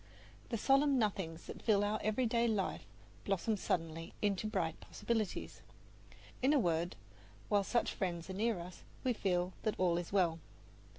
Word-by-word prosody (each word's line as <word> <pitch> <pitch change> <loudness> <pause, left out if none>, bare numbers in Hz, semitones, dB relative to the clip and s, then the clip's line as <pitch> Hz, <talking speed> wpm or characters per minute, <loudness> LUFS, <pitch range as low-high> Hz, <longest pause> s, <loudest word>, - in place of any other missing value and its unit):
The 230 - -1
solemn 275 +4 +4
nothings 190 -7 -1
that - - -8
fill 205 -3 +3
our 210 +1 0
everyday 235 +2 +2
life 210 -4 -1 0.4
blossom 200 +3 +1
suddenly 165 -4 -2
into 205 0 0
bright 190 -7 -1
possibilities. 225 -4 -3 0.8
In 265 +3 +4
a 295 - +5
word, 170 -4 +1 0.5
while 205 -1 +4
such 235 +4 +1
friends 175 -3 -2
are 190 - -5
near 220 +2 +1
us 175 +1 -9 0.2
we 255 -2 +2
feel 180 -3 0
that 215 - 0
all 175 -2 +3
is 175 - -6
well. 175 -4 +2
200 Hz, 155 wpm, -35 LUFS, 175-225 Hz, 0.8 s, a